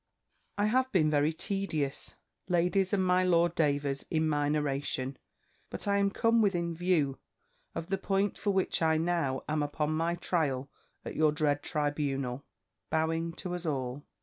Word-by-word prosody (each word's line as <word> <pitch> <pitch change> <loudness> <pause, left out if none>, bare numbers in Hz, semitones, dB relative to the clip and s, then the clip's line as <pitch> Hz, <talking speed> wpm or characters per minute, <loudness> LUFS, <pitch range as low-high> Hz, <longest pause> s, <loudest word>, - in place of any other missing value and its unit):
"I 205 - +2
have 260 +4 +2
been 155 -5 +3
very 145 +1 +3
tedious, 160 -5 -3 0.3
ladies 180 +2 +2
and 190 -3 +2
my 180 0 +3
Lord 170 -2 +3
Davers, 145 -4 0
in 160 -1 +1
my 145 -1 +1
narration: 140 -2 -1 0.5
but - - -6
I 200 0 +3
am 200 0 +3
come 230 +3 +3
within 175 -5 +1
view 160 -6 +1 0.6
of 165 - -5
the 195 - +1
point 195 +1 0
for 205 - -2
which 190 -3 +1
I 160 -1 +3
now 165 -5 0
am 155 0 0
upon 150 +1 -1
my 165 +2 0
trial 145 -6 -1 0.3
at - - -5
your 155 -1 +4
dread 150 -2 +1
tribunal 140 -3 -2 0.5
(bowing 165 +1 0
to 180 +1 -5
us 175 -1 -4
all). 135 -1 -2
160 Hz, 160 wpm, -30 LUFS, 145-180 Hz, 0.6 s, your